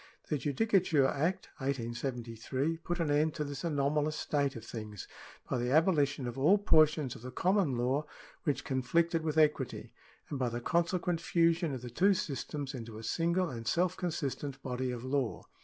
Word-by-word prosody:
The 150 Hz, -, 0 dB
Judicature 160 Hz, -, +2 dB
Act, 160 Hz, +7 st, 0 dB
1873, 125 Hz, +2 st, -2 dB
put 175 Hz, +2 st, -4 dB
an 160 Hz, -3 st, +1 dB
end 150 Hz, +2 st, +2 dB
to 150 Hz, -, -1 dB
this 140 Hz, -1 st, -6 dB
anomalous 150 Hz, -1 st, +1 dB
state 145 Hz, -2 st, 0 dB
of 115 Hz, -1 st, -8 dB
things, 105 Hz, -4 st, -7 dB, 0.4 s
by 125 Hz, -, -1 dB
the 120 Hz, +1 st, -1 dB
abolition 145 Hz, -3 st, +3 dB
of 120 Hz, +2 st, -4 dB
all 170 Hz, +10 st, +6 dB
portions 155 Hz, -8 st, +4 dB
of -, -, -11 dB
the 125 Hz, -, -6 dB
common 180 Hz, -2 st, +1 dB
law 130 Hz, +5 st, +1 dB, 0.4 s
which 145 Hz, -, 0 dB
conflicted 165 Hz, +6 st, +1 dB
with 160 Hz, -1 st, -1 dB
equity, 150 Hz, -4 st, +1 dB, 0.4 s
and 140 Hz, -, -2 dB
by 125 Hz, -2 st, +1 dB
the 120 Hz, +1 st, -3 dB
consequent 170 Hz, +4 st, 0 dB
fusion 170 Hz, -1 st, +2 dB
of 125 Hz, -, -8 dB
the 120 Hz, -, -6 dB
two 195 Hz, -, +4 dB
systems 145 Hz, -2 st, -4 dB
into 115 Hz, -4 st, -7 dB
a 110 Hz, -, -8 dB
single 170 Hz, +4 st, +1 dB
and 115 Hz, -2 st, -6 dB
self 180 Hz, +5 st, +2 dB
consistent 145 Hz, -6 st, -3 dB
body 130 Hz, 0 st, -2 dB
of 125 Hz, -1 st, -4 dB
law. 130 Hz, -2 st, -1 dB
145 Hz, 175 wpm, -32 LUFS, 125-165 Hz, 0.4 s, all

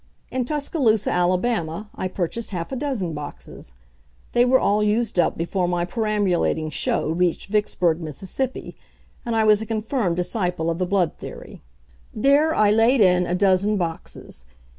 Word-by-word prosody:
In 255 Hz, -1 st, -1 dB
Tuscaloosa, 270 Hz, -, +1 dB
Alabama, 180 Hz, +1 st, 0 dB
I 185 Hz, -, -3 dB
purchased 185 Hz, +5 st, -4 dB
half 175 Hz, 0 st, -5 dB
a -, -, -2 dB
dozen 245 Hz, -, -2 dB
boxes. 145 Hz, -, -9 dB, 0.6 s
They 240 Hz, 0 st, +4 dB
were 260 Hz, +1 st, +4 dB
all 205 Hz, +1 st, +2 dB
used 210 Hz, -1 st, +1 dB
up -, -, +2 dB
before 175 Hz, +2 st, -1 dB
my 175 Hz, -1 st, 0 dB
perambulating 190 Hz, -6 st, 0 dB
show 150 Hz, +1 st, 0 dB
reached 175 Hz, +2 st, 0 dB
Vicksburg, 180 Hz, -5 st, +1 dB
Miss., 160 Hz, +4 st, -7 dB, 0.9 s
and 235 Hz, -1 st, -2 dB
I 220 Hz, -, +3 dB
was 215 Hz, -1 st, +4 dB
a -, -, -4 dB
confirmed 220 Hz, -4 st, -1 dB
disciple 180 Hz, -2 st, -1 dB
of 165 Hz, -, -4 dB
the 185 Hz, -, 0 dB
blood 185 Hz, -3 st, 0 dB
theory. -, -, -10 dB, 0.5 s
There 285 Hz, +7 st, +3 dB
I 210 Hz, -1 st, +4 dB
laid 225 Hz, +4 st, +4 dB
in 180 Hz, -3 st, +4 dB
a 175 Hz, -, 0 dB
dozen 195 Hz, +2 st, +2 dB
boxes. 165 Hz, -, -5 dB
195 Hz, 155 wpm, -23 LUFS, 175-225 Hz, 0.9 s, They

